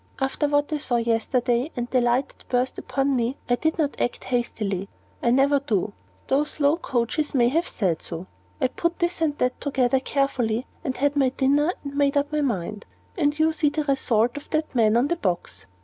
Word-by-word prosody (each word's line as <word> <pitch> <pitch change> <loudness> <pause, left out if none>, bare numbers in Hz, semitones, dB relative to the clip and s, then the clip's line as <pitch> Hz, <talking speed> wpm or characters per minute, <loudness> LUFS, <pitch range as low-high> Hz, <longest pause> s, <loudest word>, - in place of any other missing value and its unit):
After 270 +2 0
what 290 +1 +1
I 300 - 0
saw 260 -4 -1
yesterday, 235 +3 +1
and 240 -2 -2
the 255 - +3
light 245 +3 +2
that - - -22
burst 250 +1 0
upon 275 0 0
me, 245 +2 0
I 245 - +3
did 315 +5 -1
not 295 -3 -1
act 245 - -1
hastily 210 -6 -2 0.3
I 235 - +2
never 275 +3 +4
do, 215 -7 -1 0.3
though 275 +2 +2
slow 300 +1 +1
coaches 275 0 -1
may 240 -2 +4
have 330 +6 +1
said 180 -7 -1
so. 170 +1 -6 0.3
I 255 - +2
put 340 +5 -1
this 345 -1 -1
and 295 -2 +1
that 250 0 -1
together 265 -2 +2
carefully, 260 -4 0 0.2
and 265 -5 -3
had 285 +1 +1
my 270 -2 +3
dinner, 285 +5 +2
and 280 -1 -6
made 285 0 +2
up 285 +1 0
my 300 0 0
mind. 210 -6 -2 0.3
And 295 -5 +1
you 315 0 +3
see 310 -1 +2
the 305 +1 -2
result 245 -5 +1
in 290 - -6
that 310 -1 -1
man 225 -2 +4
on 250 +4 +3
the 345 - -1
box." 180 - -3
270 Hz, 205 wpm, -24 LUFS, 240-290 Hz, 0.3 s, never